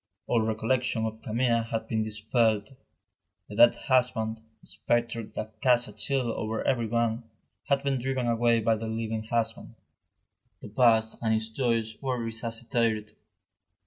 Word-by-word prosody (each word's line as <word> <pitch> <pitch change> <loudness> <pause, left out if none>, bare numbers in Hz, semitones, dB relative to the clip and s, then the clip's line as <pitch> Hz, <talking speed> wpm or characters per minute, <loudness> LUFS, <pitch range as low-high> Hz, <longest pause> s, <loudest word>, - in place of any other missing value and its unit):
All 115 - +2
recollection 110 +1 0
of 110 0 -5
Camille 115 +1 +1
had 115 0 -4
been 110 -1 0
dispelled. 110 +1 0 0.7
The 105 - -9
dead 120 +3 +7
husband, 115 -4 0 0.2
the - - -20
spectre 120 -1 -1
that 110 0 -8
cast 125 -2 +4
a - - -11
chill 120 +3 0
over 110 0 -3
everyone, 115 -1 0 0.4
had 140 -1 +1
been 135 -2 0
driven 130 0 -1
away 115 0 +2
by 110 0 +2
the 110 +1 -5
living 110 0 -3
husband. 115 0 -2 0.8
The - - -10
past 110 -1 +3
and 110 -1 +2
its 110 0 -1
joys 115 -2 -1
were 130 -2 -1
resuscitated. 115 -1 -2
115 Hz, 145 wpm, -28 LUFS, 110-120 Hz, 0.8 s, dead